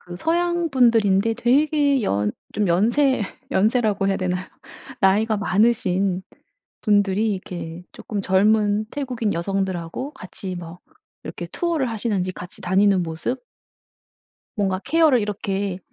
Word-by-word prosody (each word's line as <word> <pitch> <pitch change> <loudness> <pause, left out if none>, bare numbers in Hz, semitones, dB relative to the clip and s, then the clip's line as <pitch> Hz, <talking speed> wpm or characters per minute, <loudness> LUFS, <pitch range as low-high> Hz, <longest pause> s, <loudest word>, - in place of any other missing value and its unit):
그 175 -1 -9
서양분들인데 250 - +2
되게 280 +2 +2
연 105 - 0 0.2
좀 210 -3 0
연세 235 +9 +3 0.3
연세라고 215 -2 +2
해야 195 - +1
되나요? 185 0 -2 0.6
나이가 215 +3 +3
많으신 195 -3 +1 0.6
분들이 205 0 +2
이렇게 175 -3 -6
쪼끔 205 -3 -5
젊은 210 +2 +2
태국인 250 -7 -2
여성들하고 190 - -3
같이 185 0 -7
뭐 170 0 -9 0.5
이렇게 - - -6
투어를 330 -8 -1
하시는지 205 -5 -1
같이 180 -1 -10
다니는 190 0 +3
모습 170 +11 -4 1.1
뭔가 195 -2 0
케어를 315 -7 +4
이렇게 200 -2 -2
205 Hz, 280 characters per minute, -22 LUFS, 185-240 Hz, 1.1 s, 케어를